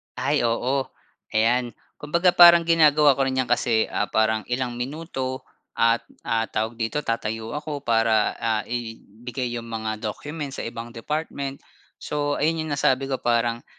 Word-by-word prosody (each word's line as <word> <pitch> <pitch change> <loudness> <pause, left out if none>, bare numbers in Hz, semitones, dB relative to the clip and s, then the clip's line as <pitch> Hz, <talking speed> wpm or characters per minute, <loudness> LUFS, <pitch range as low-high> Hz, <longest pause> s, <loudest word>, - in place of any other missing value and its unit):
Ay 135 +3 0
oo, 130 +4 0 0.5
ayan. 120 +2 +1 0.2
Kumbaga 170 +5 +2
parang 170 -1 +8
ginagawa 150 -4 +5
ko 135 - +2
rin 130 0 -1
'yan 125 - -5
kasi, 115 -2 +2
ah, 105 - -1
parang 110 0 +1
ilang 125 -1 -2
minuto 130 -1 -4 0.3
at, 115 0 +2 0.2
ah 115 0 +1
tawag 110 +2 -3
dito 115 +6 -1
tatayo 115 0 -3
ako 150 -1 -5
para, 115 -2 +2
ah, 110 -2 -1
ibigay 120 +1 -5
yung 115 - -7
mga 110 -1 -3
documents 140 +6 -5
sa - - -6
ibang 115 0 -7
department. 140 +2 -4 0.4
So, 145 -1 -2
ayun 160 +2 +1
yung 155 -2 -5
nasabi 135 0 +1
ko 130 - 0
parang, 120 0 0
125 Hz, 150 wpm, -24 LUFS, 115-145 Hz, 0.5 s, parang